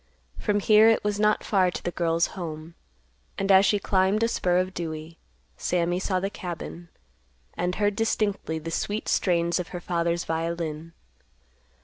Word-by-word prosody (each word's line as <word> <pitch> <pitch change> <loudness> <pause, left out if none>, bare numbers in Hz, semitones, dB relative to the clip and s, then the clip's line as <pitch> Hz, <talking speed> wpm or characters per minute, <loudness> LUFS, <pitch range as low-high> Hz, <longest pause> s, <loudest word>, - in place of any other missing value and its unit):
From 205 -1 0
here 215 +2 +6
it 225 - +2
was 205 0 -1
not 210 0 +2
far 190 -3 +2
to - - -6
the 175 - -2
girl's 170 -1 +1
home, 160 -2 -7 0.6
and, 195 0 +1
as 195 +1 +7
she 205 - +3
climbed 195 +2 +1
a - - +4
spur 180 -6 +1
of 185 +1 0
Dewey, 160 -1 -6 0.4
Sammy 175 0 0
saw 185 -1 0
the 195 +2 -3
cabin, 175 -1 -7 0.6
and 180 +1 -2
heard 205 -1 +1
distinctly 210 -7 0
the 165 +1 -6
sweet 205 +6 -2
strain's 170 -1 +1
of 180 - -4
her 180 - -6
father's 170 0 -1
violin. 165 -1 -3
180 Hz, 160 wpm, -26 LUFS, 170-200 Hz, 0.6 s, as